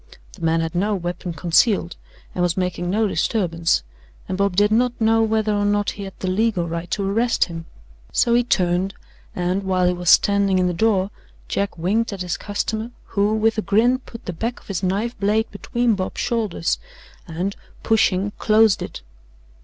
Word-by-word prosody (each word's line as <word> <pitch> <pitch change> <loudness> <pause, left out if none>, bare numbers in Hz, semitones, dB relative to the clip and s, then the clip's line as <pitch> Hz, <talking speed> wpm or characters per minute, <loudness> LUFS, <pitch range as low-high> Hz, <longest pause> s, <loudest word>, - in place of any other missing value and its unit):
The - - -14
man 165 0 +2
had 165 -1 -3
no 200 +4 +1
weapon 175 0 -4
concealed 170 +2 +2 0.4
and 180 - -2
was 175 0 +1
making 180 -1 -1
no 215 +4 +2
disturbance, 165 - 0 0.4
and 190 - -2
Bob 200 -1 0
did 205 +2 +3
not 245 +2 +2
know 225 0 +3
whether 220 -1 +1
or 205 0 +1
not 205 0 +1
he 200 - -7
had 195 - -9
the 185 - -4
legal 190 -2 +1
right 170 +1 -4
to 200 -2 -1
arrest 230 +4 +2
him, 165 -2 -8 0.4
so 235 - +2
he 240 +1 +4
turned, 185 -3 +1 0.4
and, 180 +2 0
while 185 -2 +1
he 180 - +3
was 175 -1 -1
standing 200 -2 +4
in 185 - +2
the 180 - 0
door, 200 0 +1 0.4
Jack 200 -2 -2
winked 215 +8 0
at 195 -2 -4
his 180 - -2
customer, 215 +2 -3 0.2
who, 205 +1 +2
with 220 0 +2
a - - +1
grin, 225 +6 +3
put 230 -3 -12
the 180 - -4
back 230 +8 -3
of - - -22
his 195 -2 -2
knife 200 +6 -1
blade 215 +3 +1
between 240 +3 0
Bob's 190 -2 -3
shoulders 180 - -1 0.5
and, 175 +4 -3 0.3
pushing, 205 -3 +2
closed 215 -3 +4
it. - - -7
200 Hz, 185 wpm, -21 LUFS, 180-220 Hz, 0.5 s, he